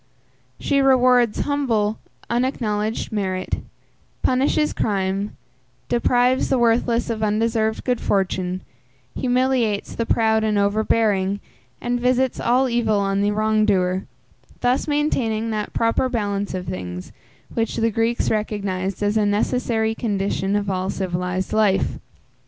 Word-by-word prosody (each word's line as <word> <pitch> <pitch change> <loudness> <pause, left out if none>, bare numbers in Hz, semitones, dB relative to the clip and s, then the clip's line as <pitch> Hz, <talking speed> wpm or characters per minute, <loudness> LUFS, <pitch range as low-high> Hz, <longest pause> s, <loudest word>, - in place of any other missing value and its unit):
She 280 -1 +1
rewards, 250 -4 +4
humble, 230 -8 0 0.3
unacknowledged 230 -4 -1
merit, 190 -3 -2 0.6
punishes 275 +4 +2
crime, 195 0 -1 0.5
deprives 245 +2 +2
the 265 - +2
worthless 235 0 +2
of 220 -1 -4
undeserved 220 +1 0
good 250 -2 0
fortune, 185 -1 0 0.5
humiliates 250 -4 0
the 230 - -3
proud 220 -1 +2
and 215 -1 +1
overbearing, 200 -1 +1 0.4
and 245 0 -1
visits 255 +1 +1
all 255 +3 +2
evil 235 -3 +1
on 195 0 0
the 205 - +2
wrong 215 +1 +2
doer; 185 -2 +1 0.6
thus 250 +4 +1
maintaining 235 -7 0
that 210 -1 -3
proper 230 +3 +1
balance 205 -5 -2
of 180 -1 -4
things, 90 - -6 0.4
which 225 -1 -1
the 225 0 +1
Greeks 230 +2 0
recognized 200 -3 -2
as 205 +1 +1
a 210 - +3
necessary 220 +1 0
condition 200 -3 -1
of 205 -1 -1
all 190 -1 -1
civilized 180 0 -2
life. 210 -3 +2
220 Hz, 125 wpm, -22 LUFS, 200-240 Hz, 0.6 s, rewards